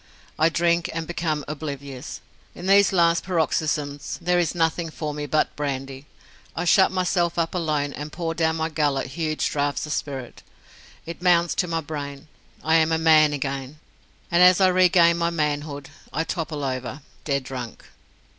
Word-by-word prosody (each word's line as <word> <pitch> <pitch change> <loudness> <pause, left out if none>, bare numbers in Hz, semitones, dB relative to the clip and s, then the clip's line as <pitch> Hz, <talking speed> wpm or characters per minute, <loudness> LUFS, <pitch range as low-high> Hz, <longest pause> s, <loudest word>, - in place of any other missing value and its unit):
I 160 +1 +5
drink 170 +1 +1
and 165 0 -2
become 155 -3 -2
oblivious. 140 -2 -6 0.3
In 175 - -8
these 200 +1 +5
last 170 -3 +3
paroxysms 155 -4 -1
there 175 0 +1
is 175 -1 0
nothing 165 0 0
for 155 -1 -5
me 145 0 -5
but 155 +2 0
brandy. 135 -1 -4 0.5
I 175 - -2
shut 190 +2 +5
myself 180 -2 0
up 165 -1 0
alone 150 -5 -1
and 150 +1 -7
pour 165 -1 -3
down 160 -1 +1
my 160 0 -1
gullet 145 -4 0
huge 155 +2 -1
draughts 145 0 -1
of 150 - -3
spirit. 135 -4 -5 0.6
It 170 +1 -8
mounts 175 -2 +3
to 180 - 0
my 165 -1 -1
brain. 145 -1 -7 0.4
I 160 +1 +4
am 160 0 +2
a 160 - +2
man 155 -2 +5
again! 135 0 -4 0.5
and 170 +1 +4
as 180 +1 +7
I 190 -1 +5
regain 180 -2 +4
my 170 0 +1
manhood, 150 -3 -3 0.2
I 160 - -1
topple 160 -4 -4
over 130 +1 -4 0.2
dead 140 -2 -1
drunk. 125 -3 -7
160 Hz, 165 wpm, -24 LUFS, 145-170 Hz, 0.6 s, as